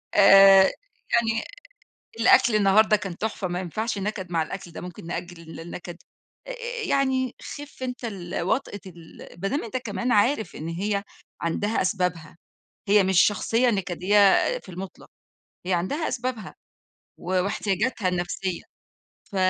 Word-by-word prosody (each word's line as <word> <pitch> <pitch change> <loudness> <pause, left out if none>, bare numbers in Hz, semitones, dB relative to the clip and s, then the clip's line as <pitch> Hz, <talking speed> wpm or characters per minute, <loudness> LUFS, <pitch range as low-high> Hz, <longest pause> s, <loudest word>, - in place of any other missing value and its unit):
آآ، 195 -1 +8 0.5
يعني 225 -2 +2 0.8
الأكل 240 -1 +5
النهارده 215 +2 +5
كان 185 -3 -7
تحفة، 215 -3 -3
ما 175 0 -3
ينفَعش 215 +5 -3
نكَد 195 -2 -4
مع 165 -1 +1
الأكل 175 +1 -8
ده، - - -8
ممكن 175 -2 -9
نأجِّل 175 0 -6
ال 165 0 -11
النكَد. 175 +1 -8 0.5
آآ، - - -5 0.3
يعني، 265 -2 0
خِفّ 290 -2 -9
أنتَ 250 -1 -5
ال 185 -5 -5
وطأة 205 +3 -1
ال 170 -2 -13
ما 195 - 0
دام 280 +9 -2
أنتَ 235 +3 -4
كمان 230 0 -3
عارف 220 +2 +2
إن 155 - -6
هي 200 +4 -2 0.4
عندها 205 +6 -1
أسبابها، 180 -4 -2 0.5
هي 205 0 +5
مش 190 0 +4
شخصية 225 +4 +2
نكَدية 195 -1 0 0.4
في - - -16
المُطلَق، 185 +1 -9 0.6
هي 185 - 0
عندها 235 - -1
أسبابها 245 -5 -4 0.6
و - - -15 0.2
واحتياجاتها 205 +1 -1
النفسية. 180 0 -3 0.7
ف - - -8
195 Hz, 140 wpm, -25 LUFS, 180-225 Hz, 0.8 s, آآ